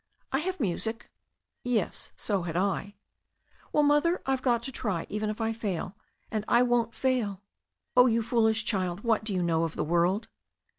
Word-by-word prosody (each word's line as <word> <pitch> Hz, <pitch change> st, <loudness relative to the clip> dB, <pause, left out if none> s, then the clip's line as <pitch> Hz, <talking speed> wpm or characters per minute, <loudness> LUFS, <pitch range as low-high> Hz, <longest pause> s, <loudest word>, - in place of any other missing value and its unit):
"I 270 Hz, -, +2 dB
have 370 Hz, +3 st, -3 dB
music." 220 Hz, +1 st, -2 dB, 0.5 s
"Yes, 235 Hz, -7 st, -1 dB
so 200 Hz, -3 st, +1 dB
had 170 Hz, -1 st, -3 dB
I." 200 Hz, +2 st, -1 dB, 0.8 s
"Well, 300 Hz, -, +3 dB
Mother, 295 Hz, +5 st, +3 dB
I've 265 Hz, -1 st, 0 dB
got 240 Hz, -3 st, +2 dB
to 265 Hz, -, -4 dB
try, 205 Hz, -10 st, -2 dB
even 210 Hz, +1 st, -2 dB
if 215 Hz, -, -4 dB
I 225 Hz, 0 st, 0 dB
fail, 200 Hz, -4 st, -3 dB, 0.4 s
and 215 Hz, -1 st, -1 dB
I 240 Hz, +1 st, +5 dB
won't 240 Hz, -2 st, +1 dB
fail." 225 Hz, -7 st, 0 dB, 0.5 s
"Oh, 250 Hz, 0 st, +7 dB
you 230 Hz, -1 st, +2 dB
foolish 220 Hz, -1 st, +2 dB
child, 185 Hz, -2 st, -1 dB
what 225 Hz, -2 st, +1 dB
do 215 Hz, -, -4 dB
you 185 Hz, -2 st, 0 dB
know 165 Hz, -1 st, +2 dB
of 165 Hz, -1 st, -3 dB
the -, -, -1 dB
world?" 175 Hz, +6 st, +1 dB
220 Hz, 180 wpm, -28 LUFS, 190-245 Hz, 0.8 s, Oh